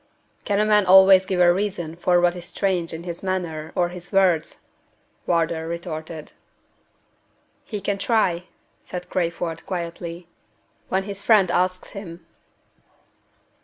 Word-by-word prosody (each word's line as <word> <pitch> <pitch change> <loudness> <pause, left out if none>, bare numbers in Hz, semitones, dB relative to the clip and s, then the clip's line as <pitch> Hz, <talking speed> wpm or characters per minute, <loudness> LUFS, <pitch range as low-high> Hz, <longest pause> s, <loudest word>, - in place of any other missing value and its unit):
"Can 205 -2 +1
a 210 - +3
man 210 -2 +3
always 190 0 +7
give 185 -2 -1
a 175 -1 +6
reason 180 -4 -3
for 175 +1 +2
what 175 0 +2
is 175 -1 -7
strange 180 -3 -1
in 160 +1 -7
his 170 -1 -6
manner 175 -5 -3
or 175 -2 +1
his 175 0 -9
words?" 185 -5 +2 0.7
Wardour 165 -1 0
retorted. 165 -2 -6 1.3
"He 210 - -5
can 200 +1 -2
try," 185 -7 +1 0.4
said 180 0 -8
Crayford, 170 -2 -2
quietly 170 -1 -5 0.6
"when 190 +1 0
his 200 0 -6
friend 200 -6 +4
asks 185 +1 0
him." 175 -4 -9
180 Hz, 130 wpm, -23 LUFS, 170-190 Hz, 1.3 s, always